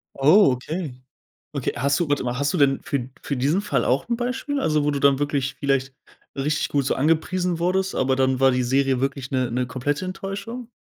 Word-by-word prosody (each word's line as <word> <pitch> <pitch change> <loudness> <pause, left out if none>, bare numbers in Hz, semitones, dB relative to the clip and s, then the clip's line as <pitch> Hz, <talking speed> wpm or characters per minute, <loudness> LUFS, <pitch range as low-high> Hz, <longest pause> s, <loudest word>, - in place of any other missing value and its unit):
Oh, 155 +4 +6
okay. 155 +3 -4 0.6
Okay, - - -2
hast 140 +5 +1
du 170 - 0
warte 145 - +1
mal, 125 0 -2
hast 145 +5 0
du - - 0
denn 140 -2 +3
für 140 - -1
d 125 +1 -7
für 140 - -2
diesen 145 +9 +1
Fall - - 0
auch 130 +3 +1
'n 235 - +1
Beispiel? 260 +4 -2
Also, 155 - +1
wo 150 - +1
du 140 - -2
dann 140 -1 +4
wirklich 140 -2 -1
vielleicht 135 -1 0 0.4
richtig 145 +2 -1
gut 140 -2 0
so - - +1
angepriesen 165 +4 0
wurdest, 190 +2 0
aber 130 0 +1
dann 130 -1 +1
war 135 0 +5
die 125 0 +1
Serie 135 0 +1
wirklich 135 -1 -3
'ne 130 -3 0
'ne 125 +1 -1
komplette 145 +7 -2
Enttäuschung? 205 +6 -6
140 Hz, 215 wpm, -23 LUFS, 130-175 Hz, 0.6 s, Oh